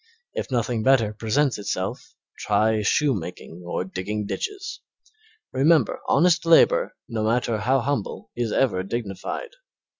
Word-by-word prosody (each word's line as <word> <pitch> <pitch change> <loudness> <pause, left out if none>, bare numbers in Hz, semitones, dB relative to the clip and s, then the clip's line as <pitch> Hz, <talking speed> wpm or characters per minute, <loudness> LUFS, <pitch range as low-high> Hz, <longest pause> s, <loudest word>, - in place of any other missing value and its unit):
If - - -4
nothing 120 -2 0
better 115 -4 +3
presents 115 +4 0
itself, 100 - -4 0.2
try 110 0 +2
shoemaking 95 - -1
or 85 +1 -2
digging 100 +3 -4
ditches. 390 - -4 0.7
Remember 145 -1 +3
honest 165 +3 +4
labor, - - +4
no 110 -3 -2
matter 115 0 +1
how 130 +4 +2
humble, 135 -4 -3
is 120 -2 -1
ever 110 -9 +2
dignified. 105 - -4
115 Hz, 120 wpm, -24 LUFS, 105-140 Hz, 0.7 s, honest